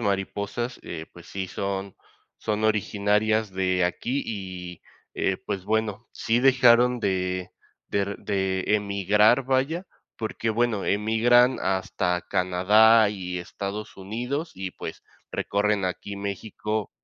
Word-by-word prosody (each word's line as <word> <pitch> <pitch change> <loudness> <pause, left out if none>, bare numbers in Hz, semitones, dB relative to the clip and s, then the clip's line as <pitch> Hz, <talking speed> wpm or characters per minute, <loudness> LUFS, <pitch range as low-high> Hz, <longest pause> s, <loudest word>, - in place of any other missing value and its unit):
mariposas, 100 +4 -2
eh, 80 -1 -6
pues 85 - -14
sí, 95 -1 -4
son 100 0 -4 0.4
son 110 0 -1
originarias 105 0 +1
de 95 -1 +1
aquí 125 +9 -1
y, 90 -4 -6 0.3
eh, 95 - 0
pues 95 -2 -3
bueno, 110 +1 -1
sí 115 +2 0
dejaron 125 -2 +5
de 90 -3 -1 0.4
der 100 0 -1
de 95 -2 -1
emigrar, 105 +4 +3
vaya, 135 +8 0 0.3
porque, 110 0 -2
bueno, 115 -2 0
emigran 115 +4 +4
hasta 90 -2 0
Canadá 105 +4 +5
y 90 -3 -4
Estados 100 +4 -6
Unidos 125 - -4
y, 95 0 -5
pues, - - -7 0.3
recorren 100 -1 0
aquí 100 +2 -4
México 105 +2 -3
100 Hz, 115 wpm, -25 LUFS, 95-110 Hz, 0.4 s, dejaron